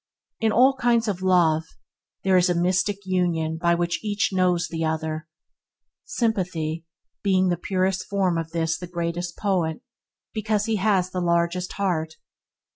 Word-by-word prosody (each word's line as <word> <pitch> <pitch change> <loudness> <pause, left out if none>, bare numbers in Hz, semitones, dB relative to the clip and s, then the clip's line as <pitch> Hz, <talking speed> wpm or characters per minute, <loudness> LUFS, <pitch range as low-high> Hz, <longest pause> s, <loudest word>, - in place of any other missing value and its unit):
In 225 -1 +2
all 255 +5 +5
kinds 235 -2 +2
of 190 -3 -2
love 170 -4 +3 0.6
there 190 -1 +3
is 180 0 +4
a 175 - +2
mystic 185 +3 0
union 170 -4 0
by 170 0 +3
which 175 +2 -1
each 205 0 0
knows 180 -2 +2
the 165 -1 -3
other. 160 0 -2 0.8
Sympathy, 175 - -2 0.3
being 190 -2 +2
the 175 - +2
purest 185 +1 -1
form 190 -3 +1
of 165 -1 -2
this 165 -1 -1
the 180 - -7
greatest 170 0 -3
poet 180 -6 0 0.5
because 215 -1 0
he 225 -1 0
has 190 -2 +1
the 185 - -2
largest 170 +1 0
heart. 160 -5 -1
180 Hz, 150 wpm, -24 LUFS, 170-195 Hz, 0.8 s, all